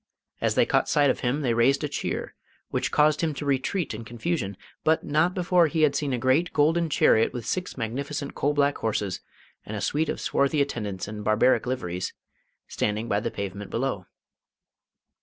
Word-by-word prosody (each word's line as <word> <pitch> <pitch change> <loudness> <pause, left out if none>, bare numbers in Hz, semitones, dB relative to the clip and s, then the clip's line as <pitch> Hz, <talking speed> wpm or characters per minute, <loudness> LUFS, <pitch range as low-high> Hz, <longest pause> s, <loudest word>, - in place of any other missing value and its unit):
As - - +1
they - - +4
caught - - +1
sight 145 -2 +4
of - - -4
him 130 +5 0
they 125 -5 +1
raised 130 +5 +3
a - - +1
cheer, 145 - -3 0.4
which - - 0
caused 150 0 +3
him 160 -3 0
to 145 - -5
retreat 140 +3 0
in 110 +2 -6
confusion, 115 - -3 0.3
but 160 +1 +2
not 160 +5 +1
before 180 -2 +3
he 155 +1 0
had 145 -2 +3
seen 145 -2 -1
a 125 - 0
great 130 +8 +2
golden 165 +3 +2
chariot 115 -6 +3
with 120 -3 -5
six 180 -5 -3
magnificent 140 +5 -4
coal 145 +1 0
black 145 0 +2
horses, 105 -4 -2 0.4
and 105 - -6
a - - -4
suite 155 +1 0
of - - -2
swarthy 140 +2 +1
attendants 105 -10 -2
in 105 0 -6
barbaric 110 +5 +3
liveries, 90 -8 -3 0.5
standing 105 +2 -2
by 100 - +2
the - - -2
pavement 100 0 -6
below. 115 -7 -2
135 Hz, 185 wpm, -26 LUFS, 110-150 Hz, 0.5 s, they